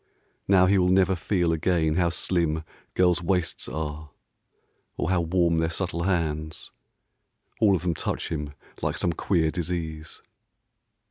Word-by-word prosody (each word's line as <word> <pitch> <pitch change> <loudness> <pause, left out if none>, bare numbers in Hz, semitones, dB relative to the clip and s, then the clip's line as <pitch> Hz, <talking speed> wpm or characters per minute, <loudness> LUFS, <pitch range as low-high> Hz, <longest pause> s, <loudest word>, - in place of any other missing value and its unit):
Now 95 -2 +6
he 95 +1 +4
will 90 0 +3
never 95 0 +4
feel 85 -1 0
again 80 -1 +1
how 85 +1 +2
slim 85 -2 -1 0.3
Girls' 90 -1 +3
waists 90 0 -1
are, 75 +2 -5 0.9
or 90 - -1
how 90 -2 +2
warm 85 -1 +2
their 80 0 +1
subtle 85 0 -3
hands, 80 -4 -2 0.9
All 100 -3 +5
of 85 - -3
them 90 -2 +1
touch - - -3
him 75 -3 -4 0.3
like - - -1
some 85 - 0
queer 80 -3 +1
disease. 80 -3 -5
85 Hz, 140 wpm, -26 LUFS, 80-90 Hz, 0.9 s, Now